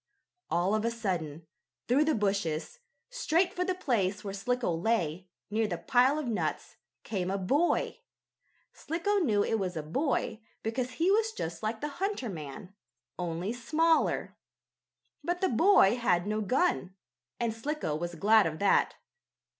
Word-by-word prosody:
All 180 +4 +1
of 215 0 +1
a 230 - +2
sudden, 175 -9 -3 0.4
through 275 +5 +4
the 310 -1 +2
bushes, 195 - -1 0.3
straight 360 -7 +1
for 360 - -1
the 370 0 -1
place 210 - 0
where 200 -2 -5
Slicko 240 -1 -1
lay, 180 -2 -1 0.2
near 220 +1 +1
the 175 -4 -3
pile 255 - +3
of 305 - -2
nuts, 230 -3 -3 0.3
came 185 -4 -2
a 195 - 0
boy. 280 - +1 0.7
Slicko 400 +6 -1
knew 215 - +2
it 225 - 0
was 185 -3 -2
a 155 - -3
boy 240 - -1 0.2
because 245 +3 -2
he 345 +4 +2
was 440 +2 +2
just 165 - -5
like 220 +1 -3
the 295 - -1
hunter 390 - -1
man, 155 +1 -8 0.5
only 175 +4 -2
smaller. 315 +7 +1 0.9
But 350 +3 -1
the 375 - +2
boy 250 - +5
had 180 -7 +2
no 215 +1 -1
gun, 215 - 0 0.4
and 235 -2 0
Slicko 230 - -3
was 170 +2 -4
glad 210 +3 +5
of 155 -1 -4
that. 200 +2 +3
220 Hz, 155 wpm, -30 LUFS, 185-295 Hz, 0.9 s, boy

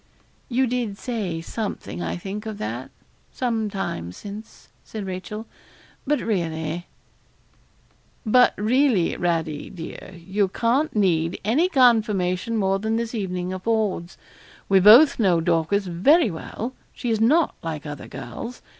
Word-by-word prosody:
'You 260 +2 +2
did 240 -5 -2
say 200 -10 -3
something, 200 -1 -5
I - - -3
think, 200 +4 -6
of 215 -2 -5
that, 120 +5 -5 0.4
some 230 -4 -1
time 90 - -4
since,' 205 - -10
said 215 -3 -6
Rachel; 190 +4 -6 0.6
'but 295 0 +2
really 165 -4 -2 0.7
' - - -36
'But 250 +3 +5
really, 225 -3 +2
Radie, 165 -4 -1
dear, 175 +2 -9
you 190 +4 -1
can't 240 +10 0
need 170 -5 +1
any 295 - +3
confirmation 225 - +2
more 195 -1 +1
than 220 +2 -1
this 230 0 -2
evening 185 -4 -3
affords. 195 -3 -1 0.5
We 195 -1 +5
both 235 +11 +8
know 185 -6 +4
Dorcas 170 +4 +1
very 215 - +4
well; 225 +9 -6 0.2
she 245 -2 -3
is 220 -1 0
not 300 +8 +4
like 160 -2 -5
other 145 -2 -7
girls. 135 - -8
200 Hz, 135 wpm, -23 LUFS, 175-230 Hz, 0.7 s, both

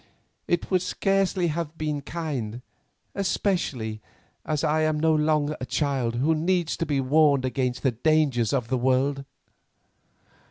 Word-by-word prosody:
"It 175 +2 -1
would 185 -1 +3
scarcely 195 -2 +1
have 160 0 -4
been 150 -2 -2
kind, 135 -8 -4 0.5
especially 145 - -1 0.4
as 150 0 -2
I 155 0 +2
am 155 -1 +1
no 160 +1 +3
longer 150 -1 +1
a - - -2
child 130 -5 -1
who 140 +7 +2
needs 170 +1 0
to 165 - -2
be 145 -2 +1
warned 140 0 +3
against 125 -1 -2
the 130 - +3
dangers 130 -3 +2
of 125 -5 -1
the 130 - 0
world." 135 +2 +1
150 Hz, 145 wpm, -25 LUFS, 130-160 Hz, 0.5 s, would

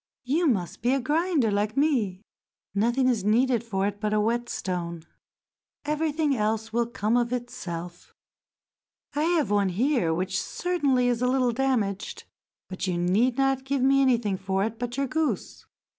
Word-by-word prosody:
"You 310 +7 +1
must 195 - -1
be 245 +4 +2
a - - +1
grinder 295 - +1
like 210 +4 -1
me—nothing 235 -1 -1
is 235 -6 +1
needed 235 +3 +2
for 195 -4 -1
it 205 0 -3
but 215 -1 0
a - - +3
whetstone; 185 -7 -2 0.8
everything 300 -1 0
else 220 0 -1
will 235 0 +1
come 225 -1 -1
of 240 -1 +1
itself. 180 -8 -6 1.0
I 295 +2 0
have 330 - +1
one 200 -2 +2
here 225 - +1
which 185 +3 -1
certainly 285 -9 0
is 240 -1 0
a 250 - +2
little 255 -1 +2
damaged, 225 -6 -1 0.4
but 185 0 -4
you 180 -2 0
need 210 +9 +2
not 270 -1 +1
give 270 -1 -1
me 275 +1 +4
anything 235 -7 +2
for 190 +1 -1
it 225 +1 -3
but 245 +1 -4
your 275 - +1
goose. 310 +3 -2
235 Hz, 160 wpm, -26 LUFS, 200-270 Hz, 1.0 s, me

